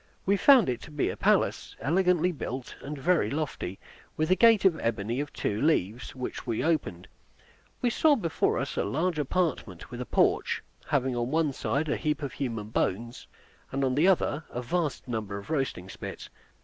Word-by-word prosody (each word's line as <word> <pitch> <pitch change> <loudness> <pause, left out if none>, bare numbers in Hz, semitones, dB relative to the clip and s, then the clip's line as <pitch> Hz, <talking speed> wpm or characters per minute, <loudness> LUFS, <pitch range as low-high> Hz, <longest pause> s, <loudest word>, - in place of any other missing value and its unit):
We 200 - +3
found 255 +1 +6
it 125 -2 -2
to - - -10
be 150 -2 -1
a - - -6
palace, - - +1
elegantly 180 - +2
built, 130 -5 -6
and 145 +1 -6
very 150 -5 +2
lofty, 140 - -3 0.4
with 155 +3 0
a - - +7
gate 225 -1 +5
of 170 -4 +4
ebony 115 +2 -1
of 145 0 -3
two 105 +1 -2
leaves, 125 - 0
which 125 0 -5
we 115 +1 -1
opened. 140 - -1 0.8
We 245 - +3
saw 305 +4 +4
before 170 - 0
us - - -3
a - - +2
large 155 - -1
apartment, 140 - -2
with 120 0 -5
a 125 - -5
porch, - - +2 0.2
having 130 -3 +1
on 120 0 -1
one 155 -1 +1
side 145 +4 -1
a 150 - 0
heap 150 0 -1
of 140 - -4
human 115 -6 -4
bones, 115 +3 -2 0.4
and 135 +1 -1
on 130 -1 +2
the 150 +7 +3
other 165 -5 +2
a 125 - -5
vast 155 0 -2
number 110 -4 -3
of 100 +9 -8
roasting 135 - -1
spits. - - -8
140 Hz, 190 wpm, -28 LUFS, 120-165 Hz, 0.8 s, a